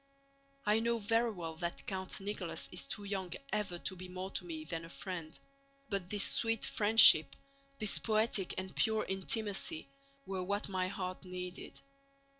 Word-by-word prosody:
I 210 +1 +3
know 235 +1 +1
very 230 +2 +1
well 165 -6 -6
that 170 +1 -4
Count 190 -1 -1
Nicholas 195 -3 -4
is 180 +9 -3
too 215 -7 -4
young 195 -3 -4 0.2
ever 205 -4 -1
to 190 - -3
be 185 0 -8
more 185 +1 -6
to - - -1
me 160 -3 -6
than 165 0 -4
a 165 - -10
friend, 170 -4 -6 0.5
but 195 -3 -2
this 205 0 0
sweet 225 -2 +3
friendship, 205 -9 +7 0.4
this 215 -2 0
poetic 215 -3 +2
and 185 0 -5
pure 220 -1 +2
intimacy, 205 - 0 0.4
were 190 -1 -3
what 200 +3 -1
my 185 -1 -1
heart 185 -1 -5
needed. 180 0 -7
190 Hz, 160 wpm, -34 LUFS, 180-215 Hz, 0.5 s, friendship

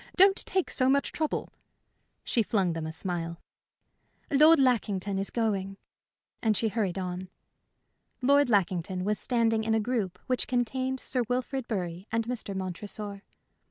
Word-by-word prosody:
Don't 390 +1 +6
take 375 -2 0
so 255 -1 +2
much 280 +1 +2
trouble." 310 -1 -2 0.7
She 235 - +1
flung 195 -5 +1
them 160 -1 -4
a - - -4
smile. 170 0 -3 0.9
"Lord 305 +3 +7
Lackington 205 -6 +1
is 195 - -1
going," 195 -4 -1 0.6
and 215 -3 +2
she 225 - +1
hurried 205 -5 -1
on. 185 0 -4 0.9
Lord 280 +1 +4
Lackington 185 -3 +1
was 210 +2 0
standing 225 -3 +1
in 220 0 +1
a - - +3
group 215 -5 -1
which 255 -1 -1
contained 260 +2 -1
Sir 255 -1 0
Wilfrid 255 +1 -2
Bury 180 -2 -4
and 230 0 0
Mr. 230 -5 -4
Montresor. 200 +2 -5
220 Hz, 145 wpm, -28 LUFS, 190-255 Hz, 0.9 s, Lord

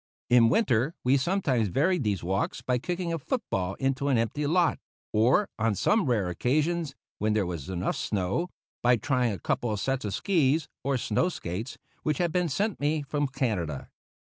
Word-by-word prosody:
In 120 -2 +7
winter 135 - +2
we 130 +2 +4
sometimes 135 - +1
varied 160 - +1
these 100 -5 -1
walks 95 +3 -1
by 125 -1 +1
kicking 175 +3 -2
a 165 - -2
foot 240 - -2
ball 95 0 -1
in 135 0 +1
an 140 -3 +2
empty 130 +6 0
lot, 170 +1 +2 0.3
or, 125 - +4
on 110 0 +2
the 210 - +2
rare 115 -9 +1
occasions 150 - 0 0.2
when 105 +1 +1
there 105 -3 +1
was 85 -5 -5
enough 90 -1 -1
snow, 100 - -1 0.3
by 120 0 +5
trying 125 -1 +1
a 100 - -3
couple 120 +7 -1
of 105 - -2
sets 135 +2 -1
of 105 -2 -2
skis 160 -5 +2 0.2
or 135 0 +1
snow 120 - +1
skates, 110 - -5 0.2
which 150 -2 0
had 175 -2 +1
been 180 0 +1
sent 205 +8 -1
me 150 +1 0
from 145 +1 -1
Canada. 105 - -2
130 Hz, 185 wpm, -28 LUFS, 105-160 Hz, 0.3 s, In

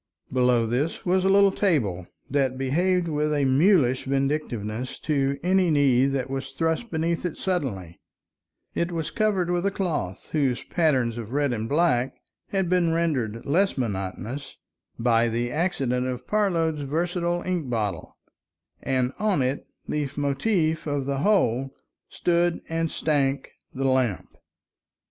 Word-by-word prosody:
Below 125 -2 +3
this 130 +8 -2
was 185 +1 +2
a 190 - +3
little 200 0 +6
table 110 - 0 0.2
that 135 -2 0
behaved 175 +7 +1
with 150 -1 0
a 145 -2 +1
mulish 135 -2 +3
vindictiveness 130 -4 -2
to 140 -2 0
any 185 0 +3
knee 135 -4 +4
that 135 -2 -1
was 135 0 -5
thrust 165 +8 -1
beneath 165 0 -1
it 175 -4 -3
suddenly; 120 - -3 0.7
it 170 +1 -1
was 165 -3 -3
covered 200 -5 +1
with 175 0 0
a - - +3
cloth 165 - -3
whose 135 -5 0
pattern 145 -8 +1
of 115 +1 -7
red 145 -2 +1
and 110 -1 -3
black 135 -5 +2 0.3
had 190 -2 0
been 175 -2 +2
rendered 135 -10 -1
less 190 +6 +2
monotonous 110 +4 -4 0.4
by 115 0 +3
the 120 +1 -1
accidents 135 -7 0
of 125 -1 -4
Parload's 165 -7 +1
versatile 175 +4 -1
ink 175 -7 -2
bottle, 110 -4 -3 0.6
and 130 -1 0
on 205 -9 +2
it, 130 +2 -2 0.2
leit 145 -2 -3
motif 155 +3 0
of 145 -2 -1
the 140 0 -1
whole, 135 - +2 0.4
stood 175 0 +1
and 165 0 -1
stank 140 -4 0 0.2
the 135 +1 -3
lamp. 130 - 0
145 Hz, 140 wpm, -25 LUFS, 125-170 Hz, 0.7 s, little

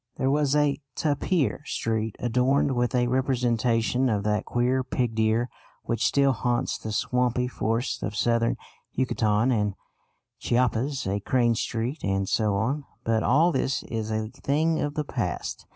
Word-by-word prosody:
There 130 +1 +1
was 145 -1 +2
a 150 -1 +2
Tapir 150 0 0
Street 110 -5 -2
adorned 125 +3 +1
with 120 +1 0
a 125 -1 +3
representation 125 -1 +1
of 105 -3 0
that 105 0 0
queer 125 +2 +1
pig 125 -2 -1
deer 110 +2 +1 0.4
which 115 - 0
still 140 -1 +3
haunts 120 0 -1
the 110 - -5
swampy 125 +2 0
forests 115 +1 -2
of 105 - -3
Southern 115 +1 +1 0.4
Yucatan 115 -2 +1
and 105 -4 0 0.6
Chiapas; 125 +3 0
a 100 +2 -1
Crane 120 +2 +2
Street, 115 +5 -3
and 95 0 0
so 105 -1 +1
on. 130 +9 -1 0.2
But 110 -1 +1
all 160 +9 +4
this 135 -2 -1
is 110 -2 -4
a 110 0 -2
thing 155 +5 0
of 145 0 -2
the 150 - -1
past. - - -4
120 Hz, 150 wpm, -26 LUFS, 110-135 Hz, 0.6 s, all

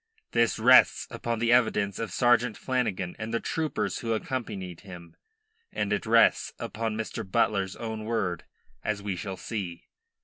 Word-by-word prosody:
This 115 -1 +2
rests - - +6
upon 115 0 -3
the 115 +1 +1
evidence 105 -5 +2
of 115 -5 -3
Sergeant 120 0 +3
Flanagan 105 -9 -2
and 110 +1 -4
the 115 - 0
troopers 160 -2 -2
who 115 -2 -1
accompanied 100 -7 -4
him, 85 -4 -11 0.6
and - - -1
it - - -2
rests - - +4
upon 110 -1 -3
Mr. 110 0 -4
Butler's 100 -2 0
own 110 -2 -5
word, 105 -7 -2 0.4
as 100 -2 -2
we 100 -2 -2
shall 95 0 -5
see. 95 -7 -6
110 Hz, 150 wpm, -28 LUFS, 95-115 Hz, 0.6 s, rests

